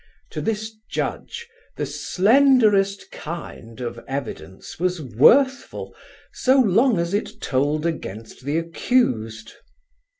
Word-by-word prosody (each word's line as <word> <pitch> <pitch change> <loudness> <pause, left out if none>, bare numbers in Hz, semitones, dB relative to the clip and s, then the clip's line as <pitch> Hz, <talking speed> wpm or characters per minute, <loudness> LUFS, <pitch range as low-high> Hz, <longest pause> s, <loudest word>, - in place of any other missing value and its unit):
To - - -4
this 220 0 -3
judge 470 - -4 0.3
"the - - -1
slenderest 210 -3 +3
kind" 150 -8 -8
of 120 -1 -5
evidence 135 -7 -6
was 180 0 0
worthful 255 - +3 0.4
so 260 +1 +3
long 230 +1 +4
as 170 +2 -1
it 205 - -2
told 145 +4 0
against 115 - -5
the 145 +4 -1
accused. 125 - 0
170 Hz, 105 wpm, -22 LUFS, -, 0.4 s, long